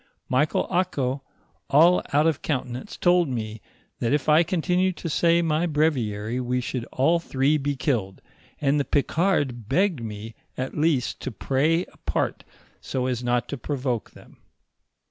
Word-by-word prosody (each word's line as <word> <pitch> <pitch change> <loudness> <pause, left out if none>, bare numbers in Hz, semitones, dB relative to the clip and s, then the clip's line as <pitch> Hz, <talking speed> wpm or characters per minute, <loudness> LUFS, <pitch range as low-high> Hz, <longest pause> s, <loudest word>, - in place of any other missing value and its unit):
Michael 145 +4 +2
Ako, 140 -8 0 0.5
all 165 +5 +6
out 150 +2 +3
of 160 -3 +1
countenance, 130 - -3
told 175 -3 +3
me, 110 -3 -4 0.4
that 115 - 0
if 145 - 0
I 155 +1 +6
continued 180 +1 +1
to 165 - -4
say 170 +2 +3
my 160 +1 +1
braviary 125 -8 0
we 125 0 -1
should 125 -1 -3
all 160 +9 +2
three 140 -2 +1
be 145 0 -1
killed, 115 -9 -1 0.4
and 145 0 +2
the 140 - 0
Ficard 145 - 0
begged 175 -1 +2
me 110 0 -7 0.2
at 130 +1 -4
least 150 -5 +1
to 130 - -5
pray 150 - +1
apart, - - -3 0.4
so 130 -1 -3
as 125 -1 -2
not 120 0 0
to 140 - -4
provoke 130 -5 -2
them. - - -17
140 Hz, 150 wpm, -25 LUFS, 125-165 Hz, 0.5 s, all